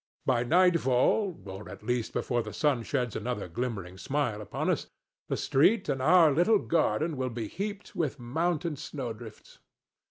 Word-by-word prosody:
By 125 Hz, -2 st, +2 dB
nightfall—or, 160 Hz, -, +2 dB
at -, -, -10 dB
least, 120 Hz, 0 st, -1 dB
before 120 Hz, -2 st, 0 dB
the -, -, -7 dB
sun 145 Hz, -6 st, +1 dB
sheds 125 Hz, -1 st, -2 dB
another 110 Hz, -3 st, -3 dB
glimmering 95 Hz, -2 st, -4 dB
smile 130 Hz, -6 st, -1 dB
upon 105 Hz, -, -4 dB
us—the -, -, -6 dB
street 190 Hz, +10 st, +3 dB
and 135 Hz, -2 st, 0 dB
our 160 Hz, +2 st, +6 dB
little 175 Hz, +10 st, +4 dB
garden 165 Hz, -3 st, 0 dB
will 130 Hz, 0 st, -1 dB
be 115 Hz, -2 st, -4 dB
heaped 200 Hz, -, -6 dB
with 155 Hz, -6 st, -1 dB
mountain 160 Hz, +5 st, -1 dB
snowdrifts. 120 Hz, -6 st, -8 dB
130 Hz, 145 wpm, -29 LUFS, 120-165 Hz, -, our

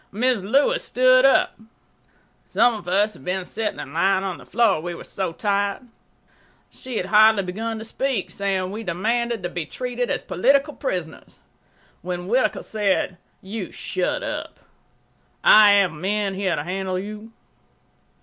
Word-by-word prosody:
Mrs. 220 Hz, -2 st, 0 dB
Lewis 275 Hz, +4 st, +2 dB
stood 255 Hz, +1 st, +4 dB
up. 270 Hz, -, +3 dB, 0.9 s
Some 240 Hz, 0 st, +3 dB
of 210 Hz, -5 st, -8 dB
us 205 Hz, +4 st, +2 dB
had 130 Hz, -, -14 dB
been 180 Hz, +2 st, -2 dB
sitting 220 Hz, +3 st, -4 dB
and 140 Hz, -, -8 dB
lying 190 Hz, +3 st, +2 dB
on 190 Hz, -3 st, -4 dB
the -, -, -15 dB
floor, 215 Hz, -6 st, +2 dB
we 175 Hz, +1 st, -5 dB
were -, -, -9 dB
so 190 Hz, -3 st, -4 dB
tired. 200 Hz, +3 st, -1 dB, 0.9 s
She 255 Hz, -3 st, -7 dB
had 180 Hz, -, -1 dB
hardly 215 Hz, 0 st, +5 dB
begun 220 Hz, +5 st, -4 dB
to 220 Hz, -, -7 dB
speak, 260 Hz, -3 st, -2 dB
saying 190 Hz, -2 st, -2 dB
we 215 Hz, +2 st, -5 dB
demanded 225 Hz, +4 st, -1 dB
to 175 Hz, -, -2 dB
be 175 Hz, -3 st, -5 dB
treated 245 Hz, +2 st, -3 dB
as -, -, -2 dB
political 275 Hz, -, +2 dB
prisoners, 180 Hz, -, -5 dB, 0.6 s
when 175 Hz, 0 st, -5 dB
Whittaker 245 Hz, +7 st, +1 dB
said: 200 Hz, -4 st, -1 dB, 0.2 s
"You 195 Hz, -1 st, -6 dB
shut 185 Hz, -1 st, -3 dB
up. -, -, -6 dB, 0.8 s
I 210 Hz, -1 st, +8 dB
have 200 Hz, -4 st, +4 dB
men 195 Hz, +5 st, -2 dB
here 190 Hz, -2 st, -1 dB
to 145 Hz, -, -3 dB
handle 185 Hz, +2 st, -3 dB
you." 210 Hz, +3 st, -7 dB
200 Hz, 155 wpm, -22 LUFS, 185-225 Hz, 0.9 s, I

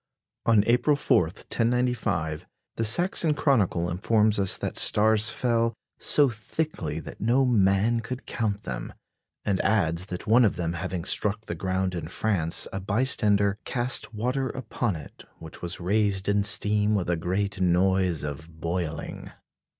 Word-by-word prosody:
On 110 Hz, -3 st, +5 dB
April 125 Hz, +5 st, +3 dB
4, 90 Hz, -, +2 dB
1095, 95 Hz, -6 st, -2 dB, 0.3 s
the 115 Hz, -, -2 dB
Saxon 160 Hz, -, +2 dB
Chronicle 100 Hz, -, +1 dB
informs 105 Hz, +4 st, +2 dB
us 95 Hz, -2 st, +2 dB
that -, -, -4 dB
stars 110 Hz, +1 st, +4 dB
fell 115 Hz, -2 st, 0 dB, 0.2 s
"so 145 Hz, -1 st, +5 dB
thickly 110 Hz, -, -4 dB
that 80 Hz, -, -10 dB
no 125 Hz, +5 st, +3 dB
man 105 Hz, 0 st, +2 dB
could 125 Hz, +3 st, -6 dB
count 105 Hz, -3 st, -2 dB
them," 60 Hz, -2 st, -6 dB, 0.5 s
and 95 Hz, -2 st, +1 dB
adds 95 Hz, -4 st, +1 dB
that 90 Hz, -1 st, -6 dB
one 115 Hz, +3 st, +5 dB
of 105 Hz, -, +2 dB
them 85 Hz, -1 st, -2 dB
having 90 Hz, 0 st, -4 dB
struck 105 Hz, +2 st, 0 dB
the -, -, -4 dB
ground 95 Hz, 0 st, -2 dB
in 85 Hz, -3 st, -5 dB
France, 90 Hz, -3 st, 0 dB
a 95 Hz, -, -2 dB
bystander 105 Hz, -1 st, +1 dB
"cast 125 Hz, 0 st, -1 dB
water 125 Hz, +4 st, -2 dB
upon 120 Hz, -5 st, -3 dB
it, 75 Hz, -, -11 dB
which 80 Hz, -1 st, -11 dB
was 85 Hz, 0 st, -4 dB
raised 100 Hz, +1 st, 0 dB
in 100 Hz, 0 st, +2 dB
steam 105 Hz, 0 st, +3 dB
with 95 Hz, -4 st, -1 dB
a 85 Hz, -, +1 dB
great 95 Hz, +3 st, -2 dB
noise 90 Hz, -2 st, +2 dB
of 80 Hz, +3 st, -7 dB
boiling." 85 Hz, -1 st, -4 dB
100 Hz, 150 wpm, -26 LUFS, 90-115 Hz, 0.5 s, On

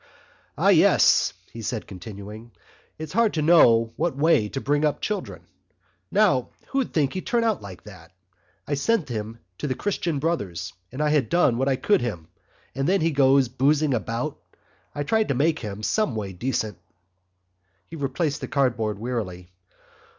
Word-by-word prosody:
"Ah, -, -, +3 dB
yes," -, -, +5 dB, 0.2 s
he 115 Hz, -, -7 dB
said, 110 Hz, 0 st, -3 dB
continuing, 105 Hz, +4 st, -9 dB, 0.5 s
"it's 155 Hz, 0 st, -7 dB
hard 225 Hz, -1 st, +2 dB
to 155 Hz, -, 0 dB
know 115 Hz, -9 st, +5 dB
what 170 Hz, -6 st, -1 dB
way 145 Hz, -8 st, +3 dB
to 135 Hz, -, -4 dB
bring 145 Hz, +2 st, 0 dB
up 150 Hz, -1 st, +1 dB
children. 210 Hz, -1 st, -4 dB, 0.7 s
Now -, -, +2 dB, 0.2 s
who'd 270 Hz, -2 st, -1 dB
think 145 Hz, -4 st, +1 dB
he'd 185 Hz, -, -5 dB
turn 240 Hz, -3 st, +1 dB
out 220 Hz, -4 st, 0 dB
like 95 Hz, -3 st, -10 dB
that! -, -, -13 dB, 0.6 s
I 145 Hz, -, -2 dB
sent 150 Hz, +4 st, 0 dB
him 110 Hz, -1 st, -5 dB, 0.2 s
to -, -, -2 dB
the 130 Hz, -, -1 dB
Christian 175 Hz, -4 st, -2 dB
Brothers 100 Hz, -, -3 dB, 0.2 s
and 135 Hz, +4 st, -2 dB
I 150 Hz, 0 st, +3 dB
done 130 Hz, -1 st, +2 dB
what 135 Hz, +1 st, +1 dB
I 135 Hz, -, +2 dB
could 175 Hz, +8 st, +2 dB
for 120 Hz, -, -1 dB
him, 85 Hz, -7 st, -7 dB, 0.4 s
and 135 Hz, +4 st, -1 dB
there 195 Hz, -, +4 dB
he 165 Hz, -2 st, +1 dB
goes 135 Hz, -2 st, +4 dB
boosing 140 Hz, +4 st, +2 dB
about. 120 Hz, +5 st, -3 dB, 0.6 s
I 145 Hz, -, -2 dB
tried 220 Hz, +8 st, +1 dB
to 140 Hz, -, 0 dB
make 160 Hz, +4 st, +1 dB
him 105 Hz, -2 st, -6 dB
someway 110 Hz, -, -1 dB
decent." 110 Hz, -2 st, -3 dB, 1.1 s
He 165 Hz, -, -10 dB
replaced 150 Hz, +1 st, -2 dB
the -, -, -4 dB
cardboard 120 Hz, -7 st, 0 dB
wearily. 100 Hz, -7 st, -4 dB
135 Hz, 165 wpm, -24 LUFS, 110-160 Hz, 1.1 s, yes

